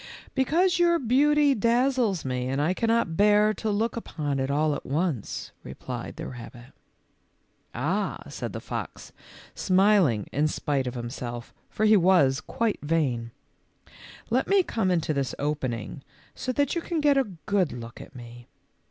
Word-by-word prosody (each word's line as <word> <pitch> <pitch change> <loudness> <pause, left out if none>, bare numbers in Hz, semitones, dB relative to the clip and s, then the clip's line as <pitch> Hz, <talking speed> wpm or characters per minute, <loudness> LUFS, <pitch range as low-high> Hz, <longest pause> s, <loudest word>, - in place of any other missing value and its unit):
K - - -14
Because 345 +7 +2
your 340 -1 +4
beauty 285 +3 +3
dazzles 235 - +1
me 125 -1 -2
and 135 +2 -1
I 155 +5 +2
can 230 - -1
not 225 -8 +1
bear 210 +2 +4
to 220 - -3
look 215 +3 0
upon 150 -11 -3
it 135 0 -1
all 150 +2 +2
at - - -5
once," 150 - -2
replied 120 - -7
the - - -6
rabbit. 120 0 -10 1.0
"Ah," 180 - -1
said - - -5
the - - -5
fox, - - -6 0.4
smiling 185 - +3
in 150 +3 +1
spite 140 -3 -1
of 125 0 -4
him 120 0 -5
self, 120 -3 -6 0.2
for 215 - 0
he 215 0 +6
was 165 -7 +4
quite 225 +6 -1
vain, 140 -7 0 0.5
" - - -19
let 255 +3 +2
me 395 -1 +4
come 220 - -1
into 165 -3 +1
this 140 -3 -2
opening 135 -4 -3 0.3
so 255 - -3
that 285 +3 +1
you 340 - -1
can 335 -1 -2
get 295 -2 +4
a 270 - +4 0.2
good 195 -6 +1
look 115 0 -8
at - - -13
me." 120 0 -11
170 Hz, 170 wpm, -26 LUFS, -, 1.0 s, he